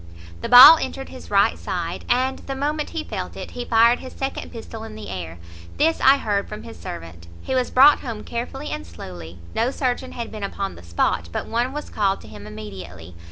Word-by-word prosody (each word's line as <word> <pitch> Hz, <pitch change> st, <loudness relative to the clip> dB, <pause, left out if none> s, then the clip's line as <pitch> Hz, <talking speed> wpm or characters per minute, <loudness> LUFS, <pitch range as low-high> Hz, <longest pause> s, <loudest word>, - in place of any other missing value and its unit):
"The -, -, -4 dB
ball 260 Hz, +6 st, +11 dB
entered 270 Hz, 0 st, -5 dB
his 260 Hz, -, -11 dB
right 200 Hz, -1 st, +3 dB
side, 175 Hz, -1 st, -4 dB
and 260 Hz, +2 st, +1 dB
the 270 Hz, -, -6 dB
moment 295 Hz, +2 st, -2 dB
he 325 Hz, -2 st, -4 dB
felt -, -, -6 dB
it, -, -, -7 dB
he 245 Hz, 0 st, -5 dB
fired 235 Hz, +1 st, +4 dB
his 260 Hz, -, -9 dB
second 270 Hz, 0 st, -4 dB
pistol 225 Hz, -1 st, -8 dB
in 220 Hz, -1 st, -9 dB
the 215 Hz, -, -8 dB
air. 85 Hz, -3 st, -6 dB, 0.4 s
This 325 Hz, +2 st, +2 dB
I 270 Hz, +1 st, +7 dB
heard 205 Hz, -6 st, -1 dB
from 210 Hz, 0 st, -7 dB
his -, -, -11 dB
servant. 85 Hz, 0 st, -9 dB, 0.2 s
He 265 Hz, -, -3 dB
was 255 Hz, -1 st, +1 dB
brought 280 Hz, +3 st, +7 dB
home 225 Hz, -4 st, -6 dB
carefully 250 Hz, +5 st, -5 dB
and -, -, -4 dB
slowly; 85 Hz, +1 st, -10 dB, 0.2 s
no 230 Hz, +3 st, +1 dB
surgeon 260 Hz, -1 st, -2 dB
had 235 Hz, -2 st, -6 dB
been 215 Hz, -, -7 dB
upon 200 Hz, 0 st, -3 dB
the -, -, -13 dB
spot, 85 Hz, 0 st, -1 dB
but -, -, -3 dB
one 240 Hz, +3 st, -1 dB
was 295 Hz, +2 st, -6 dB
called 200 Hz, -2 st, +1 dB
to -, -, -13 dB
him 105 Hz, 0 st, -11 dB
immediately. 95 Hz, -5 st, -9 dB
225 Hz, 210 wpm, -22 LUFS, -, 0.4 s, ball